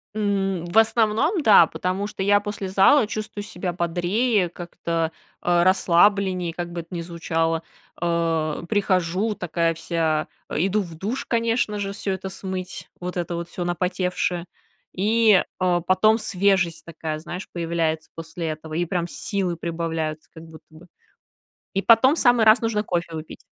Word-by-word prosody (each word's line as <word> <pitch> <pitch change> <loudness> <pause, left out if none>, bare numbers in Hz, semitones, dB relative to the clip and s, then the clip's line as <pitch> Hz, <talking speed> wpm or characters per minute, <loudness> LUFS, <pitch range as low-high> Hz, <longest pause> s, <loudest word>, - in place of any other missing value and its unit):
М, 195 -4 0
в 175 - -2
основном, 225 - +3
да, 205 -8 +7
потому 185 +5 -2
что 195 -2 -5
я 205 +1 +4
после 205 -2 -5
зала 205 +7 +5
чувствую 215 -1 -5
себя 180 -3 -4
бодрее, 180 +5 +1
как-то, 165 -1 -3 0.3
э, 175 -1 +3
расслабленнее, 185 -1 +3
как 175 0 -5
бы 175 - -5
это 170 +2 -10
ни 170 - -3
звучало. 165 -1 -1 0.4
Э, 165 -2 0
прихожу 195 0 +1
такая 170 -1 0
вся, 160 -2 -1 0.2
э, - - -5
иду 195 +4 +1
в 170 -4 -8
душ, 210 +10 -4
конечно 230 -2 0
же, 195 -1 -3
всё 200 0 -3
это 190 0 -5
смыть, 185 -1 -6
вот 180 +1 -4
это 175 0 -2
вот 170 0 -5
всё 175 - -4
напотевшее, 180 0 -1 0.5
и, 215 0 +4 0.2
э, 180 -1 +2
потом 215 +5 +4
свежесть 195 -5 +1
такая, 160 -2 -5
знаешь, 180 +4 -7
появляется 165 -2 -2
после 165 +1 -6
этого, 155 0 -6
и 175 +2 0
прям 175 0 -2
силы 185 -3 -2
прибавляются 165 -2 -3
как 160 - -11
будто 160 -1 -14
бы. 165 +3 -15 0.9
И 195 - 0
потом 230 +6 +6
в - - -1
самый 245 -3 +4
раз 220 +3 +6
нужно 225 -2 0
кофе 170 -4 -2
выпить. 155 0 -9
180 Hz, 160 wpm, -23 LUFS, 170-205 Hz, 0.9 s, да